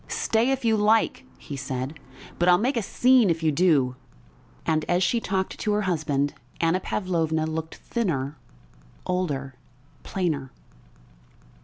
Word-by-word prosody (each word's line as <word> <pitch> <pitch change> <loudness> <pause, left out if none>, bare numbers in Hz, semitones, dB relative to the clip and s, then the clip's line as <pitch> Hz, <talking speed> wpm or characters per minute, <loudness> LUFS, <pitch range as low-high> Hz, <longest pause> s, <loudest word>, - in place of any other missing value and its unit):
"Stay 225 +3 +1
if 270 -2 -1
you 225 -1 +4
like," 215 +1 +2
he 145 - -8
said, 130 +2 -4 0.4
"but 175 +1 +4
I'll 175 - +7
make 250 +8 0
a 230 - +1
scene 245 +1 +4
if 165 -1 0
you 155 - +3
do." 145 -6 +3 0.7
And 155 -1 +1
as 175 +1 +2
she 235 +6 +2
talked 190 -3 -2
to 210 - 0
her 210 0 +1
husband 145 -6 0 0.3
Anna 165 +2 +2
Pavlovna 165 -5 -1
looked 160 0 -4
thinner, 150 - -2 0.7
older, 145 -8 -2 0.5
plainer. 155 -8 -2
175 Hz, 140 wpm, -25 LUFS, 150-210 Hz, 0.7 s, I'll